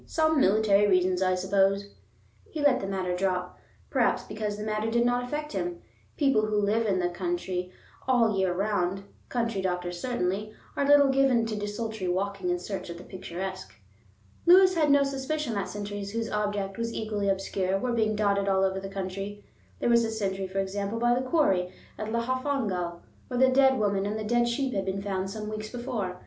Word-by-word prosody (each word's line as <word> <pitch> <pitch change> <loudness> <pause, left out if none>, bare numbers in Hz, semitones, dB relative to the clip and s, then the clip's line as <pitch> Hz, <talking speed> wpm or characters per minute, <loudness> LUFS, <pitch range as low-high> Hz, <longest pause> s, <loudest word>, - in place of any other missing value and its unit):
"Some 315 -2 +2
military 205 0 +4
reasons, 185 -1 +2
I 185 -1 +3
suppose." 195 +2 +1 0.6
He 315 - -6
let 285 -3 +4
the 195 - -4
matter 185 -2 -2
drop, 180 -1 -2 0.3
perhaps - - +2
because 210 -1 -4
the 210 - -5
matter 215 +1 -1
did 235 +1 +2
not 245 0 +1
affect 300 +4 -4
him. 345 0 -3 0.4
People 270 -7 +3
who 210 -1 +1
live 215 +2 +1
in 195 -2 +2
the 180 -1 +1
country 180 0 -3 0.4
all 235 -4 +3
the 195 - -1
year 190 -1 +2
round, 195 0 -1 0.3
country 230 -5 -1
doctors 180 -1 -2
certainly, 215 -3 -2 0.2
are 280 - +1
little 285 -1 +6
given 265 -4 +3
to 225 -1 -3
desultory 210 -1 -4
walking 190 +1 -1
in 175 - +1
search 185 0 -6
of 170 - -6
the 175 - -10
picturesque. 185 +1 -6 0.7
Lewis 370 +1 +8
had 315 -4 +2
no 285 0 +5
suspicion 275 0 -2
that 200 -2 -2
sentries 205 -1 -5
whose 230 0 -2
object 205 -1 -2
was 230 0 -2
equally 210 -2 -1
obscure 195 0 0
were 245 +4 -1
being 215 -2 +1
dotted 200 -1 +1
all 190 -1 +3
over 190 0 +1
the 195 0 -6
country. 195 +1 -5 0.3
There - - 0
was 235 0 +5
a 225 - -1
sentry, 195 -3 -2
for 190 +1 -7
example, 200 +2 -2
by 240 +1 +3
the 250 - +1
quarry 190 - +2 0.3
at 215 - -3
Llanfihangel, 235 -8 -1 0.3
where 250 -1 -2
the 260 0 +6
dead 265 0 +5
woman 200 -2 +1
and 210 +1 -2
the 215 - -4
dead 240 +2 +2
sheep 255 +2 -1
had 195 -2 -1
been 195 +1 -2
found 190 -1 -2
some 210 +1 -6
weeks 215 0 -5
before. 220 -7 -4
205 Hz, 195 wpm, -28 LUFS, 190-235 Hz, 0.7 s, Lewis